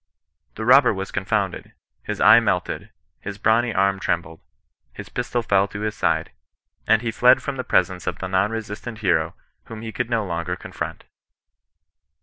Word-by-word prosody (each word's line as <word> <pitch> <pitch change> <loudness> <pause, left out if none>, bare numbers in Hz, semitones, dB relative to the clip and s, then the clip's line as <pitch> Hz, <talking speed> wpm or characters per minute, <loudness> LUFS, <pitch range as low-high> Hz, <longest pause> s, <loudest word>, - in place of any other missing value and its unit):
The 110 - -5
robber 130 -2 +6
was 95 0 -5
confounded; 100 -1 -2 0.3
his - - -5
eye - - +8
melted; - - -2 0.3
his 100 0 -7
brawny 115 +3 +2
arm 95 -1 +1
trem 85 -3 0
bled; 80 0 -13 0.5
his - - -9
pistol 120 -1 -2
fell 100 -3 +2
to 100 +1 -7
his 105 0 -2
side; - - 0 0.6
and 110 +2 +4
he 115 - -1
fled 125 +3 +4
from 140 - -3
the 130 - -4
presence 90 -6 0
of - - -2
the 95 - -4
non 95 +2 +1
resistant 110 +1 -6
hero 80 -3 +1 0.3
whom 115 -1 -9
he 110 - -5
could 115 +2 -3
no 115 -3 0
longer 85 0 -3
confront. - - -6
105 Hz, 170 wpm, -22 LUFS, 95-115 Hz, 0.6 s, eye